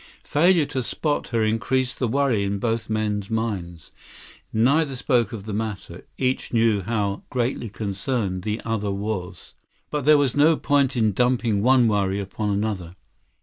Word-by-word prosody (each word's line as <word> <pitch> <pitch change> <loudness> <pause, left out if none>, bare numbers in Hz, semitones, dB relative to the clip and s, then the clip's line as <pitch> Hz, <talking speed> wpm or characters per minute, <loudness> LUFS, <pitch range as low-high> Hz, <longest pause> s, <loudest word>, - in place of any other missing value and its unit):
Failure 170 +1 +3
to 130 - -3
spot 145 +5 -2
her 115 -2 0
increased 125 +4 0
the 125 - +1
worry 125 -4 +1
in 100 0 -1
both 115 +1 -2
men's 105 -2 -1
minds. 100 -7 -3 0.6
Neither 135 +5 +2
spoke 125 -4 +1
of 110 -4 -6
the 105 0 -6
matter. 100 -5 -5
Each 130 0 -1
knew 115 -3 +2
how 100 -1 -2
greatly 120 -2 -2
concerned 100 -1 -2
the 105 +3 -3
other 110 -3 -1
was. 100 -2 -4 0.4
But 150 -3 -2
there 150 0 +7
was 140 -4 +1
no 150 +2 +5
point 140 -2 +1
in 110 -2 +3
dumping 120 -1 +1
one 125 +1 +5
worry 100 -2 +1
upon 100 +2 -3
another. 100 -4 -2
110 Hz, 155 wpm, -23 LUFS, 100-130 Hz, 0.6 s, there